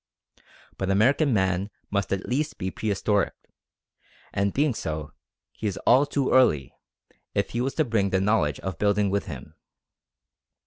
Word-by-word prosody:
But 95 - -1
American 130 +9 +3
Man 95 -2 +1 0.2
must 100 -1 -1
at 100 -1 -1
least 145 +5 -1
be 95 0 -3
prehistoric; 105 0 0 1.0
and 100 0 +1
being 145 +2 +1
so, 75 -6 -4 0.4
he 110 - -4
is 100 - -3
all 135 +4 +5
too 140 -2 0
early, 80 - +3 0.6
if - - 0
he 120 - -1
was 135 +2 -2
to 155 - +2
bring 110 -5 +1
the 95 - +1
knowledge 95 -8 +1
of 95 -4 -5
building 100 -1 +2
with 100 0 -1
him. 70 -8 -8
100 Hz, 150 wpm, -26 LUFS, 95-125 Hz, 1.0 s, all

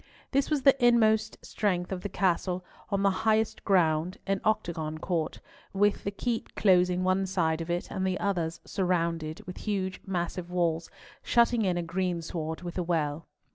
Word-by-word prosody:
This 275 0 +2
was 295 -4 0
the 275 -2 +7
inmost 220 -3 +4
strength 180 -4 -1
of 185 -2 -3
the 205 - -4
castle, 180 -1 0 0.2
on 200 0 0
the 200 - +4
highest 220 0 +1
ground, 175 -2 +2
an 195 -1 0
octagon 160 -7 -1
court, 165 -1 -2 0.3
with 205 +1 +2
the - - -1
keep 225 +3 -3
closing 180 -2 +3
one 185 +1 +2
side 165 -4 0
of 165 - -6
it, 175 +1 -2
and 190 - -2
the 185 0 -1
others 170 -5 -1
surrounded 170 -4 -1
with 180 - -8
huge 190 -3 -2
massive 175 -1 -3
walls, 170 -2 0 0.3
shutting 235 -2 +3
in 180 -2 +1
a 175 - -1
greensward 170 -2 -3
with 175 +1 -4
a - - 0
well. 160 -2 -1
180 Hz, 170 wpm, -28 LUFS, 170-200 Hz, 0.3 s, the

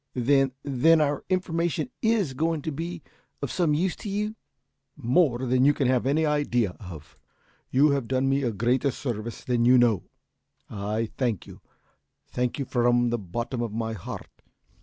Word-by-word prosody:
"Then 135 +1 +3
then 145 +4 +4
our 145 -2 0
information 175 - -1
is 220 - +1
going 160 +2 -1
to 160 - -2
be 165 +3 -5 0.4
of 140 - -2
some 165 -5 +1
use 180 +4 0
to 210 - -6
you?" 210 +2 -2 0.6
"More 130 0 +2
than 125 +1 +2
you 145 +1 +5
can 135 - +1
have 130 0 +2
any 155 +3 +2
idea 140 -9 +1
of. 85 -7 -11 0.5
You 140 +3 +4
have 140 -4 -1
done 130 +1 +1
me 135 +1 +2
a 125 -4 0
greater 120 +6 +1
service 120 -4 -5
than 120 -2 +1
you 125 +2 +6
know. 120 -5 +4 0.7
I 105 +2 -3
thank 120 -7 0
you - - -13 0.7
thank 125 -1 -1
you 140 - -2
from 120 -1 +2
the 120 - 0
bottom 115 +6 -4
of 115 -3 -3
my 115 0 -2
heart! 100 - -9
130 Hz, 170 wpm, -26 LUFS, 120-150 Hz, 0.7 s, you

